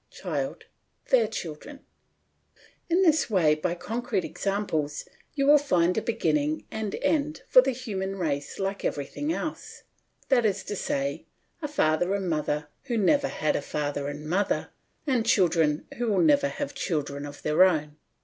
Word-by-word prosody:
CHILD: - - -4 0.5
Their 240 -4 +5
children. 220 - -7 1.1
In 355 +3 +3
this 315 -6 +3
way, 175 -8 +4
by 170 +3 -1
concrete 210 +2 -2
examples, 180 -8 -2 0.3
you 275 -2 +1
will 295 +1 +7
find 180 -11 +2
a 220 - +1
beginning 155 -10 0
and 220 -2 -3
end 305 0 0
for 255 - +8
the 265 - 0
human 205 -7 -3
race 145 -6 -2
like 195 +1 -3
everything 150 - -2
else - - -5 0.5
that 255 -3 +4
is 200 -3 0
to 205 - -4
say, 275 +6 -2 0.3
a 300 - -2
father 175 - +1
and 195 -2 -2
mother 150 -2 -1 0.2
who 240 -4 -1
never 280 +7 +3
had 155 - -1
a - - 0
father 145 -1 -3
and 145 +1 -6
mother, 190 +5 0 0.3
and 255 -6 +1
children 165 -8 +2
who 240 - 0
will 205 -3 +2
never 285 -3 +4
have 285 0 -4
children 145 - -2
of 145 0 -9
their 155 +4 +5
own. 155 -5 +1
195 Hz, 160 wpm, -27 LUFS, -, 1.1 s, for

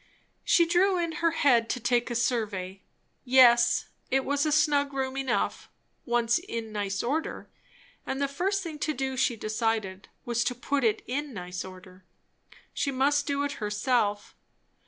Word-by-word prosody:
She 340 - +4
drew 365 +3 +3
in 335 -3 -2
her 335 - +4
head 250 -8 +3
to 250 - -1
take 240 0 +1
a 240 - -3
survey. 205 -6 -2 0.4
Yes, 240 -2 +5 0.2
it 270 0 +1
was 285 +2 +1
a - - 0
snug 290 -2 +2
room 265 -1 -2
enough, 265 -3 -2 0.4
once 235 +4 +2
in 230 - -6
nice 200 -2 -2
order; 295 +7 -3 0.5
and 270 - -4
the 280 - +1
first 380 +8 -1
thing 315 -3 -7
to 305 0 -1
do, 265 0 -2
she 255 -1 +1
decided, 215 -3 -2 0.2
was 235 0 0
to 250 - -1
put 275 +3 -1
it 220 -2 +1
in 280 0 -4
nice 180 -1 -5
order. 185 0 -13 0.7
She 280 - -1
must 280 +2 +1
do 285 -1 0
it 285 - -3
herself. 210 -1 0
250 Hz, 160 wpm, -27 LUFS, 225-285 Hz, 0.7 s, Yes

